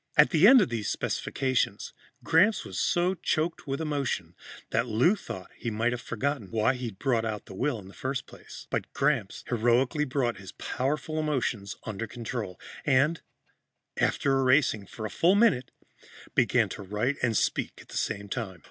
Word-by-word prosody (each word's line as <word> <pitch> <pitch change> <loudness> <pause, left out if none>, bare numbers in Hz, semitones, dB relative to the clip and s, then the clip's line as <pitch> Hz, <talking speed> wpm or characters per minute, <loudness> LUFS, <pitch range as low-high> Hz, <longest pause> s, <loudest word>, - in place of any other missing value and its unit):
At 150 - +7
the 165 +4 +6
end 260 0 +9
of 190 - +1
these 115 -3 -2
specifications, 130 -2 -1 0.3
Gramps 195 +7 +4
was - - -5
so 180 0 +2
choked 160 -3 -1
with 135 0 -2
emotion 140 - -2 0.4
that 115 +2 +1
Lou 125 - +3
thought 95 - -8
he 120 - -4
might 110 +2 0
have 120 0 -3
forgotten 125 -2 -2
why 115 +3 +2
he'd 120 -6 -6
brought 120 -2 +1
out 110 -2 -3
the - - -10
will 130 +6 -1
in 95 -3 -11
the 95 - -13
first 130 -1 -3
place. - - -12
But - - -2
Gramps 135 -9 0
heroically 125 +5 +2
brought 130 -5 -1
his 95 0 -10
powerful 150 +4 -2
emotions 120 -10 -1
under 110 +1 -4
control 115 -4 -5 0.2
and, 150 +4 +3 0.7
after 135 -1 +2
erasing 130 -6 +3
for 110 +3 -7
a - - -3
full 180 +4 +4
minute, 200 - +3 0.6
began - - +3
to - - -7
write 105 +8 -1
and 115 -4 +2
speak - - 0
at - - -15
the - - -9
same 100 0 -2
time. 100 -5 -4
125 Hz, 175 wpm, -28 LUFS, 110-150 Hz, 0.7 s, end